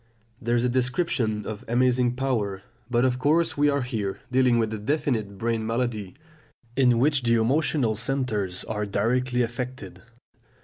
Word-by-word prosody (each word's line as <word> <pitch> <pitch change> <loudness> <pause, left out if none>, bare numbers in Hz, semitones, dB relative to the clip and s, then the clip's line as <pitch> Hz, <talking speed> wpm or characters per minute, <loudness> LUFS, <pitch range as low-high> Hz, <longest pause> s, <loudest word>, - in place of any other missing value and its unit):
That 120 0 -1
is 120 0 +2
a - - +2
description 125 - 0
of 105 -2 -6
amazing 125 0 +2
power, 110 -8 -1 0.3
but 120 0 +2
of 125 -1 +1
course 160 +4 +2
we 145 0 +3
are 140 -2 +1
here 110 -6 -3
dealing 125 -2 +4
with 110 -1 0
a 110 - -4
definite 110 -5 -1
brain 115 +1 -1
malady, 115 -3 -2 0.6
in 125 -3 +4
which 140 +2 +2
the 115 -1 +2
emotional 125 +1 +2
centres 110 -6 -1
are 105 -1 -3
directly 125 +5 +1
affected. 120 -6 -6
120 Hz, 150 wpm, -25 LUFS, 110-130 Hz, 0.6 s, dealing